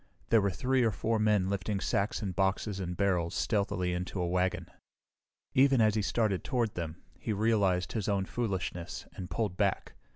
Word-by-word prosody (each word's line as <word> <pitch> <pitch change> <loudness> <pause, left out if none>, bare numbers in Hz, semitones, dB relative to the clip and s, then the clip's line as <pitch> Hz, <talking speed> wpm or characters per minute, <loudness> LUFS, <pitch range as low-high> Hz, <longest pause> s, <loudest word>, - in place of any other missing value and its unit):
There 115 -2 +5
were 100 - +2
three 125 +8 +1
or 115 - +4
four 110 +2 -1
men 105 -3 +3
lifting 100 +1 -1
sacks 105 +1 -1
and 95 -3 -3
boxes 95 +1 0
and 90 -2 -4
barrels 90 -4 +1
stealthily 100 -4 0
into 90 +2 -3
a 90 - 0
wagon. 90 +1 0 0.9
Even 135 0 +5
as 110 -2 +4
he 110 - +1
started 100 -2 0
toward 120 -4 0
them 85 -2 -5 0.2
he 110 - -2
realized 100 -4 +2
his 110 -3 -2
own 100 -2 +1
foolishness 95 -6 -3
and 90 -1 -6
pulled 95 0 -2
back. 100 -2 0
100 Hz, 175 wpm, -31 LUFS, 90-110 Hz, 0.9 s, There